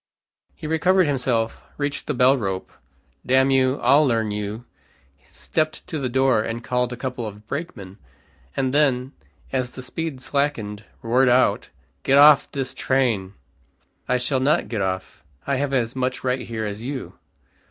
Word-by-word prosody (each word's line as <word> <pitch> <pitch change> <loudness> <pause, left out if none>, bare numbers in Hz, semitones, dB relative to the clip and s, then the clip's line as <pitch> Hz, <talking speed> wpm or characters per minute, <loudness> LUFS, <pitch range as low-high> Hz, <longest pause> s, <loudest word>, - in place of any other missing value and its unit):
He - - -10
recovered 180 +4 +3
himself, 125 -5 -1 0.2
reached 145 -1 -3
the 150 - -1
bell 125 +2 +5
rope, 95 -7 -3 0.5
"Damn 130 +1 +3
you, 130 0 +2
I'll 145 +2 +6
learn 115 -6 +1
you," 105 +3 -4 0.6
stepped 155 -1 -2
to 155 - -4
the 130 -2 -2
door 130 -3 +3
and 115 +2 -4
called 125 +1 0
a 125 - -5
couple 125 -3 -4
of 105 0 -10
brakemen, 110 - -6 0.6
and 130 -1 0
then, 135 -3 +2 0.4
as 130 -2 -1
the 130 - -10
speed 160 +1 -5
slackened; 120 -7 -2 0.2
roared 125 +3 +3
out, 125 +1 +2 0.3
"Get 135 - +3
off 145 0 +7
this 135 -2 -3
train." 115 -8 0 0.7
"I 125 - +2
shall 130 +2 0
not 140 +4 +1
get 110 -4 -2
off. 95 0 -4 0.2
I 140 -1 0
have 140 0 -1
as 125 -3 0
much 130 0 -2
right 125 -1 -1
here 110 -1 -3
as 105 +1 -5
you." 130 +2 -6
130 Hz, 160 wpm, -23 LUFS, 115-140 Hz, 0.7 s, off